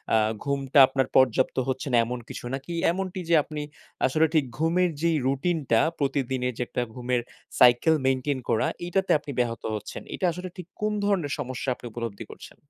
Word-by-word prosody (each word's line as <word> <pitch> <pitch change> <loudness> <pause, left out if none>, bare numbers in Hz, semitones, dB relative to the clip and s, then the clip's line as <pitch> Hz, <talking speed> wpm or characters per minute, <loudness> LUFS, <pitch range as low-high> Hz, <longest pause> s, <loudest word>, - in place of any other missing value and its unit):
আ - - +6 0.3
ঘুমটা 140 0 +1
আপনার 135 0 0
পর্যাপ্ত 130 0 +3
হচ্ছে 130 +2 -2
না - - +6
এমন 125 +1 -4
কিছু - - -7
নাকি 140 +6 -7 0.2
এমনটি 185 +1 -4
যে, 170 - +5
আপনি 150 -2 -6 0.4
আসলে 155 +5 +3 0.3
ঘুমের 170 +3 +2
যেই 165 -2 +2
রুটিনটা 140 -4 +1 0.2
প্রতিদিনের 130 -3 -1
যে - - -4
একটা 125 - -2
ঘুমের 125 -1 -1 0.4
সাইকেল 125 +6 +6
মেইনটেইন 130 +1 0
করা, 110 - +2 0.2
এটাতে 190 +2 0
আপনি 145 -1 -8
ব্যাহত 115 -1 -1
হচ্ছেন। 105 - -6
এটা - - -1
আসলে 180 +2 -6
ঠিক 180 -1 -8
কোন 215 - +1
ধরনের 180 -8 +1
সমস্যা 130 +1 -3 0.2
উপলব্ধি 115 -2 -5
করছেন? - - -12
135 Hz, 165 wpm, -26 LUFS, 125-165 Hz, 0.4 s, আ